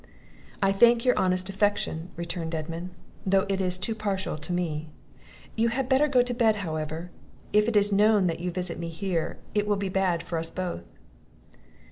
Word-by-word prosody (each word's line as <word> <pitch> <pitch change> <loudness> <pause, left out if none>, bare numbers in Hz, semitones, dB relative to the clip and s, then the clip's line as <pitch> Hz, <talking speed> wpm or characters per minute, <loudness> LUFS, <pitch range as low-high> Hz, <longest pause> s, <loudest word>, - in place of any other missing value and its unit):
"I 195 - +4
thank 235 +4 +5
your 250 - +4
honest 185 0 +1
affection," 195 -4 0
returned 170 -1 -4
Edmund, 165 +3 -5 0.3
"though 195 0 +3
it 195 -1 0
is 180 -1 +1
too 225 +5 0
partial 200 -5 -2
to 155 +3 -7
me. 160 -3 -2 0.7
You 230 +1 +2
had 250 +2 -1
better 270 +3 +4
go 255 -4 +4
to 245 0 -2
bed, 230 -3 +3
however; 155 +2 -4 0.4
if 210 +1 +4
it 235 - 0
is 205 0 +3
known 205 0 +4
that 170 -2 -1
you 180 +1 -2
visit 180 -1 -2
me 170 0 -4
here, 165 0 -2 0.2
it 210 0 +1
will 205 - +2
be 195 -1 -2
bad 185 -3 +1
for 170 -1 -3
us 165 - -1
both." 180 - -4
185 Hz, 185 wpm, -27 LUFS, 170-210 Hz, 0.7 s, thank